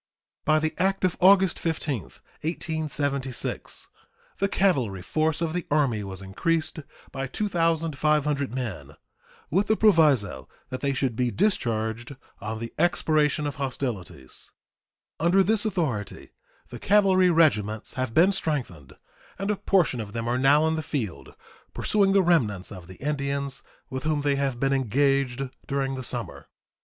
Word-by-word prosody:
By 155 0 +4
the 155 0 0
act 195 +1 +1
of 180 - +1
August 190 -1 +5
15, 150 - -2 0.4
1876, 145 -5 -3 0.5
the 200 - +2
cavalry 130 - +1
force 155 - 0
of 165 -1 -1
the 180 -1 -3
Army 135 -8 +1
was 95 -1 -7
increased 155 +13 -1 0.3
by 135 0 -4
2,500 155 - 0
men, 110 - -5 0.6
with 195 +6 +2
the 220 - +3
proviso 145 - +3 0.2
that 130 0 -5
they 140 -1 0
should 130 -3 -1
be 125 +1 +1
discharged 120 - -1 0.2
on 110 +2 -4
the 115 +1 -6
expiration 155 -3 +2
of 145 - -4
hostilities. 120 - -5 0.7
Under 180 +4 +4
this 215 +3 +1
authority 135 - -3 0.4
the - - -8
cavalry 190 -2 +4
regiments 110 - +2
have 130 -3 -3
been 180 +4 +6
strengthened, 120 - -3 0.4
and 195 +2 -1
a - - +1
portion 180 -10 +1
of 105 -2 -6
them 115 0 -3
are 125 +2 0
now 145 +4 +5
in 160 - +1
the 160 - -1
field 100 - -5 0.4
pursuing 200 -2 +2
the 195 -1 +5
remnants 115 - +1
of 90 -4 -10
the 95 - -11
Indians 140 +1 -2 0.3
with 130 0 -3
whom 155 0 0
they 145 -1 +1
have 135 -3 -1
been 135 +1 +2
engaged 135 +1 +1 0.2
during 135 -1 -1
the 130 - -4
summer. - - -6
140 Hz, 145 wpm, -26 LUFS, 120-165 Hz, 0.7 s, been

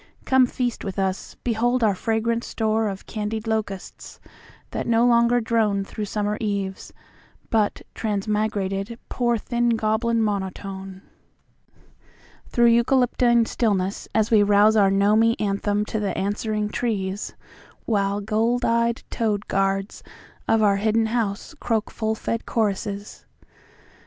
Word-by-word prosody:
Come 260 -1 +4
feast 245 -1 -3
with 195 -1 -5
us; 190 -1 -2
behold 240 +1 +1
our 210 -2 +4
fragrant 225 +3 0
storeOf 220 -4 -1
candied 215 0 -4
locusts, 215 -4 -4 0.5
that - - -3
no 230 0 +3
longer 235 0 +4
droneThrough 215 -3 -1
summer 210 0 -2
eves, 200 -3 -3 0.6
but 215 -2 +1
transmigrated, 210 0 -2
pourThin 240 0 +1
goblin 225 +1 +1
monotoneThrough 195 -1 -4 1.5
eucalyptine 235 0 +3
stillness 200 -4 -1
as 220 0 +2
we 215 -2 +6
rouseOur 205 0 +5
gnomy 215 +4 +3
anthem 205 0 0
to 220 - -3
the 200 -3 -2
answering 210 +1 -1
trees, 205 -4 -3 0.5
While 200 -2 0
gold 225 +4 0
eyed 235 0 +1
toad 210 -3 -1
guards 195 +1 -1 0.5
of 225 -1 +3
our 200 -1 +4
hidden 220 +2 +1
houseCroak 225 +1 -2
full 220 -1 -1
fed 230 +1 -3
choruses. 205 -2 -2
215 Hz, 110 wpm, -23 LUFS, 200-230 Hz, 1.5 s, we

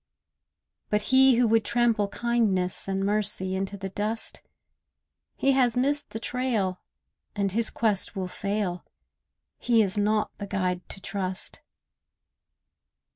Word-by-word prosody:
But 210 0 +1
he 265 -1 +7
who 240 0 +3
would 225 0 +4
trample 230 -2 +2
kindness 205 -6 0
And 195 0 -1
mercy 205 -2 +1
into 195 +1 -3
the 195 0 -5
dust— 210 +4 -3 0.9
He 275 - +2
has 250 -3 +3
missed 285 +3 +1
the 220 - -5
trail, 225 -7 -1 0.5
and 200 -1 0
his 225 +3 0
quest 215 -2 0
will 190 -1 -2
fail: 195 -2 -2 0.8
He 230 -2 +4
is 200 +1 -2
not 210 +1 +1
the 200 - -5
guide 185 -2 -2
to - - -8
trust. 190 -1 -3
210 Hz, 130 wpm, -27 LUFS, 195-230 Hz, 0.9 s, he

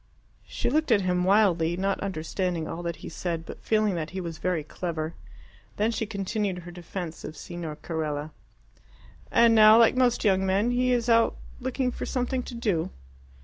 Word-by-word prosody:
She - - -2
looked 310 -3 +1
at 210 -3 +5
him 180 -1 +1
wildly, 180 -4 +3
not 195 +1 0
understanding 180 -2 -2
all 165 +1 -5
that 170 -1 -3
he - - -5
said, 165 -1 -4
but - - -9
feeling 215 -2 +2
that 160 -3 -3
he 190 - -5
was 170 -3 -6
very 180 -4 -1
clever. 160 0 -4 0.6
Then 215 +2 +2
she 220 -1 -2
continued 200 -1 -2
her 175 0 -9
defence 175 -1 -7
of 155 - -7
Signor 170 -3 -6
Carella. 155 -1 -4 1.0
"And 235 0 +5
now, 215 0 +8
like 230 +2 +5
most 250 -2 +2
young 190 -3 +3
men, 195 +5 +2
he 250 +1 +2
is 240 -1 +1 0.5
looking 260 +1 -1
out - - -6
for - - -5
something 255 0 -1
to 245 - -8
do." 205 -9 0
190 Hz, 180 wpm, -27 LUFS, 170-225 Hz, 1.0 s, now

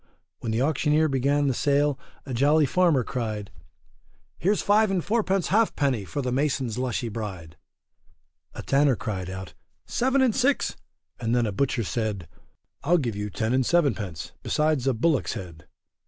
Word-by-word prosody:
When 115 - -3
the 115 +3 +1
auctioneer 155 +1 +2
began 140 +2 +1
the 135 - +2
sale, 145 +2 +1 0.3
a 135 - -5
jolly 145 +5 +4
farmer 165 -2 +3
cried, 110 -5 -4 0.9
Here's 200 +5 +1
five 210 +1 +4
and 190 -3 -1
fourpence 195 -4 +1
half 220 +3 +2
penny 130 -8 0
for 140 +9 -4
the 125 - -1
mason's 130 -3 -1
lushy 125 -1 -2
bride; 95 -8 -6 1.0
a - - -6
tanner 140 -1 +3
cried 95 -6 -4
out 95 -4 -7 0.3
seven 265 +2 +1
and 245 -5 +2
six, 270 +2 +1 0.4
and 115 0 0
then 120 -1 +2
a 105 - -1
butcher 130 +2 0
said, 105 -5 -3 0.6
I'll 170 +5 +4
give 120 -9 -2
you 105 0 -3
ten 110 +4 -1
and 130 0 +3
sevenpence, 105 - 0
besides 150 -4 0
a 135 - +2
bullock's 145 +4 +1
head. 85 -4 -9
130 Hz, 160 wpm, -25 LUFS, 110-155 Hz, 1.0 s, jolly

